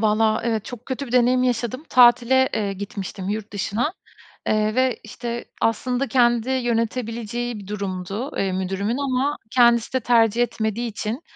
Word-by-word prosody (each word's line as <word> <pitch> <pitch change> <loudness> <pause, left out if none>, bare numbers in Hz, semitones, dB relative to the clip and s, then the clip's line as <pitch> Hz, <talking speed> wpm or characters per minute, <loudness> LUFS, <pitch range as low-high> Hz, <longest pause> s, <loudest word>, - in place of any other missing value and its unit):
Vallahi 220 +1 +2
evetö 220 -3 0
çok 245 -1 -9
kötü 265 +1 -4
bir 240 - -9
deneyim 250 0 +4
yaşadım. 250 +3 -1
Tatile, 250 +1 +5
eee, 200 -2 -1
gitmiştim 195 -1 -6
yurt 210 0 -4
dışına, 215 - -1 0.6
eee, 215 0 +1
ve, 255 -1 +1
işte, 235 +2 -5 0.2
aslında 250 +4 0
kendi 240 -2 +2
yönetebileceği 235 -1 -2
bir 195 - -11
durumdu, 200 +4 -4
eee, 195 -1 0
müdürümün. 195 +5 -2
Ama 280 +1 0
kendisi 235 -2 +4
de 260 - +2
tercih 230 -1 +3
etmediği 230 0 -2
için, 225 +4 -4
235 Hz, 150 wpm, -22 LUFS, 215-250 Hz, 0.6 s, Tatile